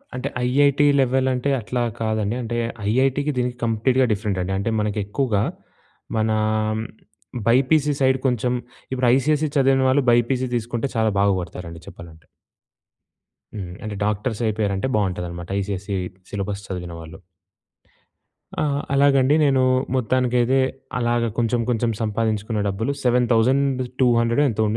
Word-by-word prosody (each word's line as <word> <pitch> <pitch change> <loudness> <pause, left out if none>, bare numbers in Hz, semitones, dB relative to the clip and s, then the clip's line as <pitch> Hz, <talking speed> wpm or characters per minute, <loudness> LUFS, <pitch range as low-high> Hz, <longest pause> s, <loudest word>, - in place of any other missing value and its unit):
అంటే 125 - -3 0.2
IIT 140 +2 +3 0.2
level 130 0 +1
అంటే 125 +3 -1
అట్లా 120 +3 -2 0.2
కాదండి. 110 0 -1
అంటే 120 +1 -4 0.3
ఐఐటీకి 135 +5 +1
దీనికి 125 0 -1
కంప్లీట్‌గా 125 +3 +2
డిఫరెంట్ 100 -2 -2
అండి. 95 - -3
అంటే 100 +3 -1
మనకి 105 0 -1
ఎక్కువగా 105 -2 0 0.7
మన 110 0 +1 1.2
బైపీసీ 140 +5 +3
సైడ్ 130 0 +4
కొంచెం 125 0 0 0.4
ఇప్పుడు 130 -1 +1
ఐసీఎస్‌‌సీ 150 +3 +1
చదివిన 135 -1 +3
వాళ్ళు 135 +2 +3
బైపీసీ 125 +2 +2
తీసుకుంటే 120 +2 -2
చాలా 110 -1 +2
బాగుపడతారండి 90 -4 -2
చెప్పాలంటే 80 -2 -13 1.3
హ్మ్. 95 -4 -6
అంటే 105 -1 -5
డాక్టర్స్ 105 +2 -2
అయిపోయారంటే 105 0 -1
బావుంటదనమాట. 90 -4 -2
ఐసీఎస్‌సీ 100 0 -3 0.4
సిలబస్ 100 0 -4
చదివిన 90 -2 -5
వాళ్ళు. 80 0 -11 1.4
ఆ! - - +1 0.3
అలాగండి 140 0 +4
నేను 135 -2 +3 0.3
మొత్తానికైతే 125 0 +1 0.4
అలాగ 120 0 +1 0.2
కొంచెం 120 0 +1
కొంచెం 120 -1 +1
సంపాదించుకున్న 110 0 -1
డబ్బులు 105 +7 -1
7200 125 0 +2
ఎంతో 110 -1 0
120 Hz, 115 wpm, -22 LUFS, 105-130 Hz, 1.4 s, సైడ్